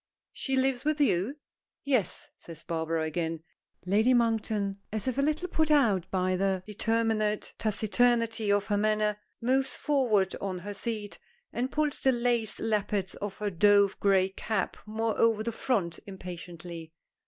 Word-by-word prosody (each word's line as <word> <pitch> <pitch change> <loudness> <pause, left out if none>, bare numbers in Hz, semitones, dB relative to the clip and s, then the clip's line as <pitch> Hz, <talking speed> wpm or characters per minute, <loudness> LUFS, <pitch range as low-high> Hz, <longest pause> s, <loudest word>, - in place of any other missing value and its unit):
"She 270 - -2
lives 265 -1 +1
with 305 0 0
you?" 260 0 +1 0.5
"Yes," 255 -8 0
says 165 -1 -10
Barbara 160 -1 -1
again. 160 0 -2 0.4
Lady 215 +7 +4
Monkton, 220 -4 0
as 220 +3 -1
if 255 +1 0
a - - +4
little 310 +5 0
put 315 -3 +1
out 225 - +3
by 185 0 +1
the 190 0 0
determined 215 0 0
taciturnity 225 0 +1
of 205 0 +2
her 205 - 0
manner, 210 0 +1 0.2
moves 265 +2 +1
forward 230 - +1
on 190 -2 -2
her 205 +4 -6
seat, 210 0 -4 0.3
and 255 +3 -1
pulls 300 -1 0
the 265 - +4
lace 235 -3 0
lappets 205 -3 -1
of 200 -1 -4
her 210 -1 -2
dove 200 +2 +4
gray 195 -1 +3
cap 205 +1 -2
more 220 +1 -1
over 225 -2 +3
to 235 - -2
the - - -12
front 190 -10 -1
impatiently. 175 -3 -8
210 Hz, 155 wpm, -29 LUFS, 190-240 Hz, 0.5 s, Lady